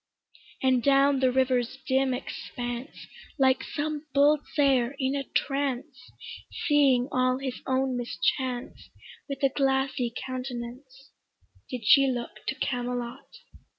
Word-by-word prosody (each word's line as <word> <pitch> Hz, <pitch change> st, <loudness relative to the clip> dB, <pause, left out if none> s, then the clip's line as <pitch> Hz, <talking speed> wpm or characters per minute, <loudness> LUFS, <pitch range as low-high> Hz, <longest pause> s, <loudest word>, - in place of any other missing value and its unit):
And 260 Hz, -2 st, +3 dB
down 275 Hz, +1 st, +4 dB
the 260 Hz, -1 st, +3 dB
river's 255 Hz, -1 st, +1 dB
dim 265 Hz, 0 st, +2 dB
expanse 245 Hz, +1 st, -5 dB, 0.3 s
Like 265 Hz, -2 st, +3 dB
some 305 Hz, 0 st, -4 dB
bold 290 Hz, +2 st, +5 dB, 0.2 s
seër 270 Hz, -3 st, +3 dB
in 265 Hz, 0 st, 0 dB
a 280 Hz, -, -1 dB
trance, 275 Hz, -1 st, -2 dB, 0.6 s
Seeing 275 Hz, -4 st, +4 dB
all 255 Hz, 0 st, +2 dB
his 265 Hz, -2 st, -5 dB
own 260 Hz, -1 st, +1 dB
mischance 245 Hz, +1 st, -2 dB, 0.4 s
With 275 Hz, 0 st, -5 dB
a 275 Hz, -, +5 dB
glassy 265 Hz, -2 st, 0 dB
countenance 255 Hz, +1 st, -7 dB, 0.6 s
Did 245 Hz, -4 st, -5 dB
she 275 Hz, +5 st, +7 dB
look 245 Hz, -2 st, -4 dB
to -, -, -1 dB
Camelot. 245 Hz, 0 st, -3 dB
260 Hz, 120 wpm, -27 LUFS, 250-275 Hz, 0.6 s, she